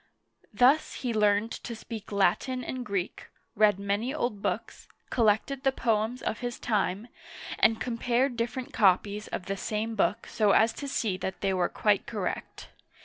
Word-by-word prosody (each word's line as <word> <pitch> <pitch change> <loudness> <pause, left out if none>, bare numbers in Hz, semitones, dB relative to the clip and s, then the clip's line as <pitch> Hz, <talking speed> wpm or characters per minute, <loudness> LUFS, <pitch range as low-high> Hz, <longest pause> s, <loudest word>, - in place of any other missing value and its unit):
Thus 255 +8 +3
he 245 -2 0
learned 210 +1 +2
to 235 - -6
speak 220 -1 -8
Latin 205 +6 +1
and 255 +1 -4
Greek, 200 -5 -3 0.3
read 210 -2 +4
many 200 +5 -1
old 240 -9 -2
books, - - -3 0.2
collected 230 +4 +2
the 270 -1 +3
poems 230 -1 0
of 225 - -2
his 245 -1 -4
time, 205 -1 -1 0.5
and 225 0 +4
compared 245 +2 0
different 235 +2 -3
copies 205 +1 +2
of 180 - -5
the 195 0 -2
same 215 +3 -3
book 205 -1 0
so 210 -3 +2
as 225 +1 +4
to 285 - -6
see 220 -8 -1
that 190 0 -5
they 195 -1 +1
were 180 -2 +1
quite 205 -2 +1
correct. 210 -6 -4
220 Hz, 160 wpm, -28 LUFS, 200-245 Hz, 0.5 s, read